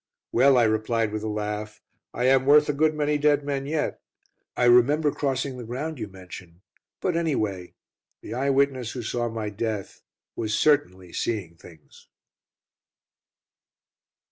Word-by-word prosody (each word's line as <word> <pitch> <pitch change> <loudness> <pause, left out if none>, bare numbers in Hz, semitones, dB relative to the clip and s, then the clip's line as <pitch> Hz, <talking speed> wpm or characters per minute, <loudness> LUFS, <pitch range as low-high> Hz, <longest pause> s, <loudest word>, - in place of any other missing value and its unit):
"Well," 135 +2 +5
I 120 - +5
replied 110 0 +1
with 110 0 -3
a 110 - -4
laugh, 105 0 -4 0.3
"I 120 - -3
am 130 0 +4
worth 150 +1 +6
a 150 - 0
good 155 +2 +2
many 150 0 0
dead 145 0 +3
men 140 -1 -3
yet. 155 0 -2 0.6
I - - +1
remember 140 +5 +5
crossing 135 -2 -2
the 125 - -7
ground 135 +6 -5
you 110 - -4
mention 90 -2 -12 0.4
but, 180 -3 0
anyway, 110 - -2 0.5
the - - -7
'eye 135 +3 0
witness' 135 -4 +1
who 125 - -5
saw 120 +1 -2
my 110 -2 -4
death 105 -1 -4 0.3
was 110 -2 -1
certainly 95 - +1
'seeing 100 -8 -3
things.'" 80 -2 -17
120 Hz, 145 wpm, -25 LUFS, 105-140 Hz, 0.6 s, worth